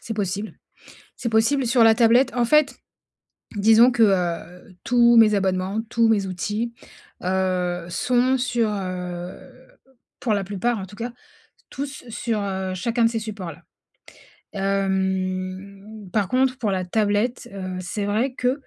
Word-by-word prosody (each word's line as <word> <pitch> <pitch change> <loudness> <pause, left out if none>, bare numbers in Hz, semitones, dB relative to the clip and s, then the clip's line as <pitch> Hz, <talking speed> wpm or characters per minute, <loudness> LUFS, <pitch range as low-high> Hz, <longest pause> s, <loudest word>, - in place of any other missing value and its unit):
C'est 225 - -6
possible. 205 +1 -3 0.6
C'est 235 - -3
possible, 235 +5 +2
sur 235 0 +4
la 225 0 +7
tablette. 240 +3 +4
En 245 -1 +1
fait, 300 +4 +3 0.8
disons 225 +4 +6
que 235 -2 +3
heu, 180 -2 -1
tous 240 -1 +4
mes 220 -2 +6
abonnements, 190 +2 0
tous 230 -1 +2
mes 205 -3 +2
outils 210 +6 -3 0.5
heu, 180 -1 -1
sont 250 +8 +1
sur 240 -3 0
heu 180 -2 -5 0.8
pour 225 - 0
la 200 -1 0
plupart 205 +4 -2
en 190 - -5
tout 200 +2 -14
cas. 235 +3 -5 0.6
Tous 280 +1 -6
sur 220 -1 -2
heu, 190 -1 -3
chacun 230 +5 0
de - - +4
ces 230 - -2
supports 210 -6 -6
là. - - -16 0.9
Hem, 195 +1 -2
par 205 -4 +1
contre 255 +2 +1
pour 215 -6 -1
la 185 -1 -1
tablette, 215 +5 0
heu, 185 -2 -5
c'est 200 +3 -4
vrai 230 +6 0
qu'il 250 0 +1
210 Hz, 150 wpm, -23 LUFS, 190-235 Hz, 0.9 s, la